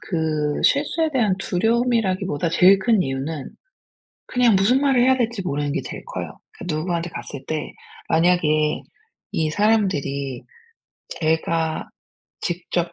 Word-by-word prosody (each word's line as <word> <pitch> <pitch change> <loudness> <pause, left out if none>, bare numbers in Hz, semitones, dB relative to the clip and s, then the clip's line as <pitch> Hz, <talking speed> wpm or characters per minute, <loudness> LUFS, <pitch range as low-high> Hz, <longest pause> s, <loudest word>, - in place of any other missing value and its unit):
그 155 -4 -1
실수에 310 +3 +2
대한 220 -7 +2
두려움이라기 225 0 +1
보다 165 0 -1
제일 190 +4 +6
큰 215 0 +2
이유는 135 +1 -4 0.8
그냥 245 -5 +3
무슨 240 +8 +3
말을 270 -3 +3
해야 260 +1 +4
될지 235 -4 -1
모르는 145 -4 -2
게 185 - -1
제일 - - -8
커요. - - -6
그 - - -11
누구한테 170 +2 -2
갔을 140 -4 -7
때 155 -1 -3 0.4
만약에 160 -3 +2 0.5
이 160 -1 0
사람들이 155 - 0 0.8
제가 160 0 0 0.5
직접 175 0 -2
175 Hz, 270 characters per minute, -22 LUFS, 155-225 Hz, 0.8 s, 제일